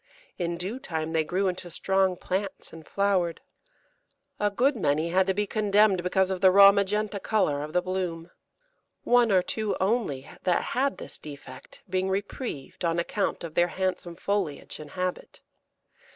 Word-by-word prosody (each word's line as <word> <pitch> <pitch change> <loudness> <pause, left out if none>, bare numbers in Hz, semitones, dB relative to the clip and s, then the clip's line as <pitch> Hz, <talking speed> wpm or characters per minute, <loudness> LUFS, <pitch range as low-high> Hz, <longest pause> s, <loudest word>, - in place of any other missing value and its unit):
In 170 -1 -1
due 195 +9 -4
time 160 -9 -4
they 160 -1 +2
grew 185 +5 0
into 180 -1 -3
strong 190 +2 +1
plants 190 +2 -4
and 160 -1 -11
flowered. 190 -4 +1 1.0
A 210 - +2
good 255 +7 +2
many 155 -4 +1
had 185 +2 +2
to 190 - +2
be 210 +1 +1
condemned 205 -2 +3
because 190 +1 +1
of 185 -1 -3
the 190 - +7
raw 200 +1 +9
magenta 205 +1 0
colour 170 -10 +1
of 150 +1 -5
the 180 +2 +1
bloom, 180 -2 -3 0.7
one 240 -2 +4
or 185 -2 +4
two 215 +1 -2
only 190 - 0
that 180 - +1
had 275 +3 +1
this - - -8
defect 140 -3 -11
being 185 0 -1
reprieved 195 - -4
on 165 0 +1
account 185 +3 -1
of 165 -2 -6
their 175 +1 +3
handsome 185 -1 -3
foliage 195 -6 -3
and 150 -1 -9
habit. 180 +3 -4
185 Hz, 165 wpm, -27 LUFS, 170-200 Hz, 1.0 s, raw